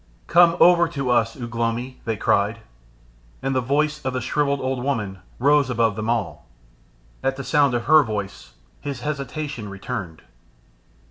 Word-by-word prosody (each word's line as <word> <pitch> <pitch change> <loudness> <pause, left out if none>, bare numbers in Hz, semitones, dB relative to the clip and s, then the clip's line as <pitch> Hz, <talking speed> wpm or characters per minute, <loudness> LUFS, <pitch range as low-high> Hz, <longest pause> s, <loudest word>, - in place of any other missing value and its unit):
"Come 170 0 +5
over 175 -1 +6
to 140 -6 -2
us, 115 +1 +1
Ugh 120 -1 -6
lomi," 120 +2 -2
they 115 -2 -1
cried, 105 +3 +1 0.8
and 135 - 0
the 130 - +1
voice 150 +4 0
of 130 - -2
the 130 - -1
shrivelled 140 +3 0
old 130 -1 -2
woman 105 -9 -2 0.2
rose 140 +1 +3
above 115 -4 +1
them 110 +1 -3
all. 115 -7 -2 0.7
At 135 0 0
the 135 - -6
sound 140 0 +2
of 120 - -2
her 155 0 +7
voice 100 - -5 0.3
his 140 -4 -5
hesitation 140 -4 -4
returned. 100 -4 -6
125 Hz, 155 wpm, -23 LUFS, 115-140 Hz, 0.8 s, her